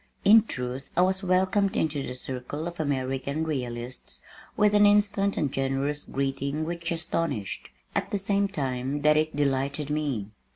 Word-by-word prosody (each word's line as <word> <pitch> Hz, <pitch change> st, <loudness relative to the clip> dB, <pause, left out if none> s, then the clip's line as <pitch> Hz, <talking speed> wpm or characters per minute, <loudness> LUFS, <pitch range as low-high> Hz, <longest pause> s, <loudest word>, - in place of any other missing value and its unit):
In 220 Hz, +2 st, +9 dB
truth 125 Hz, -, -4 dB
I -, -, +6 dB
was 190 Hz, +1 st, +2 dB
welcomed 190 Hz, +1 st, +2 dB
into 150 Hz, -3 st, 0 dB
the 125 Hz, -, -5 dB
circle 130 Hz, +5 st, -5 dB
of 175 Hz, -1 st, -7 dB
American 140 Hz, 0 st, -1 dB
realists 125 Hz, -5 st, -4 dB, 0.3 s
with 210 Hz, 0 st, +4 dB
an 205 Hz, 0 st, +7 dB
instant 205 Hz, -1 st, +3 dB
and 145 Hz, -3 st, 0 dB
generous 135 Hz, +2 st, -1 dB
greeting 140 Hz, +2 st, -2 dB
which 170 Hz, +1 st, -3 dB
astonished, 165 Hz, -, -2 dB, 0.2 s
at -, -, -1 dB
the 205 Hz, -, 0 dB
same 200 Hz, +1 st, +1 dB
time 135 Hz, -5 st, -2 dB
that 150 Hz, 0 st, +6 dB
it 155 Hz, -1 st, +1 dB
delighted 140 Hz, +1 st, 0 dB
me. 135 Hz, -9 st, -2 dB
150 Hz, 155 wpm, -27 LUFS, 135-180 Hz, 0.3 s, In